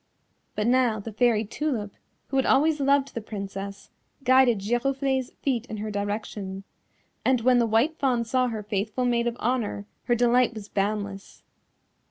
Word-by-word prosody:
But 210 - -1
now 245 -2 +3
the 215 +2 -7
Fairy 225 -1 +2
Tulip, 220 -4 -3 0.4
who 270 - -1
had 265 - +3
always 300 +3 +3
loved 275 0 +2
the 230 - -4
Princess 200 -1 -7 0.3
guided 260 -2 +5
Giroflée's 260 +5 0
feet 250 -3 0
in 215 - -6
her 215 +1 -4
direction, 205 -1 -4 0.6
and 255 -2 +2
when 250 +1 +4
the 235 - +2
White 235 +9 +2
Fawn 250 -4 +1
saw 255 +2 +1
her 220 -3 -4
faithful 215 +4 -2
Maid 240 -1 +1
of 240 0 -2
Honour 230 -4 -1 0.2
her 240 - +2
delight 245 0 +3
was 210 -1 -8
boundless. 200 -1 -3
235 Hz, 160 wpm, -26 LUFS, 210-255 Hz, 0.6 s, guided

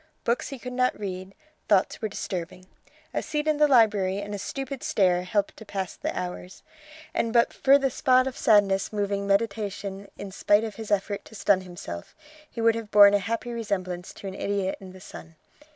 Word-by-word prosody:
Books 235 +1 0
he 275 - -6
could 250 +1 -7
not 255 -2 +1
read; 190 -1 -6 0.3
thoughts 200 -2 +2
were 215 - -1
disturbing. 180 -2 -5 0.5
A - - 0
seat 300 0 -3
in 305 -1 +2
the 300 0 +5
library 210 -7 +4
and 205 0 -6
a 205 - -4
stupid 270 +5 -5
stare 180 -3 +2
helped 200 +2 -1
to - - -10
pass 195 -3 -4
the - - -3
hours, 180 0 -7 0.5
and 230 - 0
but 235 0 +3
for 275 +1 +5
the 270 -2 0
spot 255 -1 +3
of 265 - -4
sadness 200 -3 +3
moving 200 -1 -1
meditation 200 -1 -1
in 200 -1 -7
spite 205 +2 +3
of 220 -2 -4
his 220 -2 -7
effort 200 0 0
to 220 - -13
stun 200 -2 +3
himself, 175 - -8 0.3
he 230 - -6
would 230 0 +5
have 225 -2 -6
borne 205 -1 +8
a 205 - +4
happy 230 +4 -3
resemblance 185 -6 -3
to - - -11
an 190 - -5
idiot 195 -1 -1
in 190 -1 -11
the 185 - -13
sun. 165 -2 -11
205 Hz, 200 wpm, -26 LUFS, 190-230 Hz, 0.5 s, borne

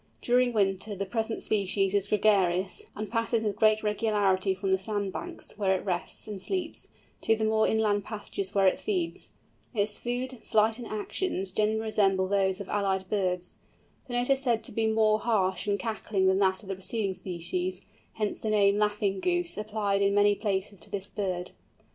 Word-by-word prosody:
During 245 0 +3
winter 200 -1 0
the 200 +1 -3
present 225 +2 -2
species 195 -2 +1
is 200 -1 +1
gregarious, 195 -3 +2
and 210 0 -5
passes 230 -1 0
with 210 -2 -1
great 215 0 +3
regularity 205 -3 +1
from 190 0 -2
the 190 - +3
sand 200 -1 -3
banks, 350 0 -7
where 190 -2 +2
it - - -9
rests 180 +1 -3
and 205 -3 -6
sleeps, 360 - -3 0.3
to 225 - +3
the 220 - -3
more 220 0 +3
inland 210 -2 +2
pastures 205 -2 -4
where 195 -1 +4
it 190 - +3
feeds. 365 -5 -2 0.5
Its 210 0 0
food, 250 +1 -2
flight, 220 +2 +2
and 240 - -6
actions 210 - -2
generally 215 +2 +1
resemble 195 -4 +2
those 190 -1 +1
of 200 - -6
allied 190 -2 -1
birds. 180 -3 -1 0.5
The 245 - -6
note 245 +2 +1
is 270 0 +3
said 235 -4 +1
to - - -6
be 225 -1 0
more 220 -1 +3
harsh 200 -4 0
and 200 -1 +1
cackling 215 -2 -1
than 190 0 +4
that 190 0 +2
of 195 - -12
the - - 0
preceding 195 +1 -1
species, 180 +1 -3 0.3
hence 210 -2 -2
the 220 - -3
name 205 -1 +4
"Laughing 205 -2 +1
Goose," 350 - 0
applied 210 -2 -1
in 200 0 +3
many 205 0 +5
places 200 -1 -2
to - - -7
this 200 -1 -4
bird. 185 -3 -3
205 Hz, 185 wpm, -28 LUFS, 190-220 Hz, 0.5 s, many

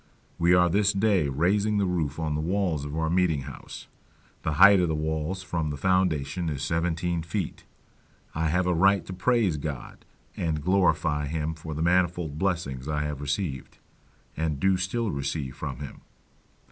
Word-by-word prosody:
We 85 +1 +5
are 90 0 +5
this 100 +3 +2
day 100 -6 +2
raising 100 +9 +1
the 100 - +2
roof 80 -5 -1
on 80 -2 -2
the 75 - -1
walls 85 -4 -1
of 75 +2 -5
our 80 0 0
meeting 85 -3 +2
house; 65 0 -9 0.6
the 80 - -1
height 100 +5 +7
of 90 - +2
the 80 - -1
walls 80 +4 -2
from 80 -4 -2
the 75 - -4
foundation 85 -2 +1
is 70 -2 -3
seventeen 85 +2 -1
feet. 85 +2 -4 0.7
I 80 +1 0
have 90 +3 +1
a 90 - +2
right 95 +1 +3
to 95 - -7
praise 95 -2 +1
God, 70 -4 -6 0.3
and 80 -3 -2
glorify 85 -5 +2
him 80 +1 -2
for 80 -1 -7
the 80 - -1
manifold 85 -3 +1
blessings 80 -9 -2
I 75 -1 -1
have 75 -2 -4
received, 70 -1 -3 0.6
and 75 -2 -2
do 95 +4 +3
still 100 +4 -1
receive 70 -1 -3
from - - -5
him. 70 - -8
80 Hz, 170 wpm, -26 LUFS, 75-90 Hz, 0.7 s, height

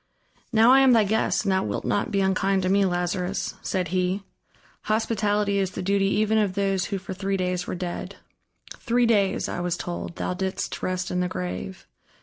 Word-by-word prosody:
"Now 225 +1 +6
I 265 - +7
am 265 -2 +6
thy 225 -2 +5
guest, 215 +1 0
and 195 - +2
thou 190 0 +2
wilt - - -3
not 205 - 0
be 200 - +1
unkind 190 0 +1
to 185 - +1
me, 200 +1 +4
Lazarus!" 180 +1 -2
said 180 -3 -2
he. 185 +2 0 0.6
"Hospitality 210 -2 +1
is 190 -1 0
the - - -4
duty 195 +1 +2
even 215 +2 +2
of 200 -3 0
those 195 -2 0
who 200 - -3
for 190 0 -7
three 195 +1 -2
days 180 -1 -2
were - - -3
dead. 175 -1 -5 0.6
Three 240 +1 +1
days, 205 -4 +2
I - - -4
was 175 0 -1
told, 175 0 -5
thou - - -2
didst 190 +1 -3
rest 185 0 -2
in 180 - 0
the 180 - +1
grave. 90 - -5
195 Hz, 195 wpm, -25 LUFS, 180-205 Hz, 0.6 s, I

